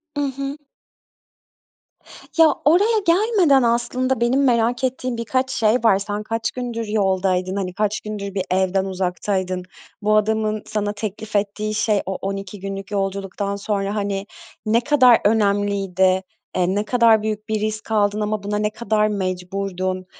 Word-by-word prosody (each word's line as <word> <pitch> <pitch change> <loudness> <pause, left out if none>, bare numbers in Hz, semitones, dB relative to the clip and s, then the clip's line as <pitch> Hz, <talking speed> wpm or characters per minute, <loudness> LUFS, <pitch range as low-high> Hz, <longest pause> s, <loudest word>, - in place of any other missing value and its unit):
I - - -2 0.2
hı. 275 +1 -4 1.8
Ya, 320 -3 +7
oraya 410 +9 +4
gelmeden 350 - +4
aslında, 240 +2 0
benim 255 +4 +2
merak 240 -1 +2
ettiğim 255 -1 -2
birkaç 255 +3 -1
şey 215 -1 +2
var. 225 -6 +3
Sen 205 +1 -4
kaç 225 +1 -2
gündür 235 -3 -4
yoldaydın? 190 -2 0
Hani 185 -2 -3
kaç 210 +2 -1
gündür 205 -2 -5
bir 190 -1 -1
evden 190 +1 +1
uzaktaydın? 185 0 -2 0.4
Bu 215 +1 +2
adamın 215 0 0
sana 210 -1 -2
teklif 215 0 -6
ettiği 210 +1 -1
şey, 215 -2 +1
o 190 0 -3
12 195 0 -5
günlük 195 0 -6
yolculuktan 200 0 -2
sonra 200 0 -2
hani, 200 -1 -2 0.4
ne 225 +2 +3
kadar 255 -4 +5
önemliydi? 200 -3 +2 0.3
Eee, 185 +1 +1
ne 205 +1 0
kadar 230 -2 +4
büyük 215 0 -4
bir 215 -1 0
risk 215 +1 -4
aldın 210 -1 +2
ama 210 -1 -2
buna 205 +1 -2
ne 210 0 0
kadar 215 -1 0
mecburdun? 185 -1 -3
210 Hz, 145 wpm, -21 LUFS, 195-230 Hz, 1.8 s, Ya